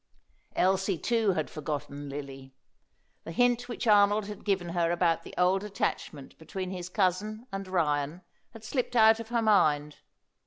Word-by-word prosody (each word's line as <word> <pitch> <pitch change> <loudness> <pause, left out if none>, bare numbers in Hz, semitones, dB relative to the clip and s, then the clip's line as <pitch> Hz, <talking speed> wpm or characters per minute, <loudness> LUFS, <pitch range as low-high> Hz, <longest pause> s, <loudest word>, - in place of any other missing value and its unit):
Elsie, 190 0 +2
too, 225 0 +1
had 155 -3 -2
forgotten 145 -1 -5
Lily. 135 -1 -8 0.7
The - - -7
hint 245 +5 +2
which 240 - -4
Arnold 205 -1 +4
had 210 0 -8
given 190 -4 0
her 170 -1 0
about 170 -1 +1
the - - -12
old 185 +2 +2
attachment 185 -8 -4
between 185 +3 -5
his 180 -1 -6
cousin 205 +5 -1
and 195 0 -5
Ryan 155 -2 -1 0.3
had 225 -2 -13
slipped 245 +1 -2
out 220 -1 +6
of 230 -1 -7
her 235 -1 0
mind. 150 -9 +3
185 Hz, 155 wpm, -29 LUFS, 160-215 Hz, 0.7 s, out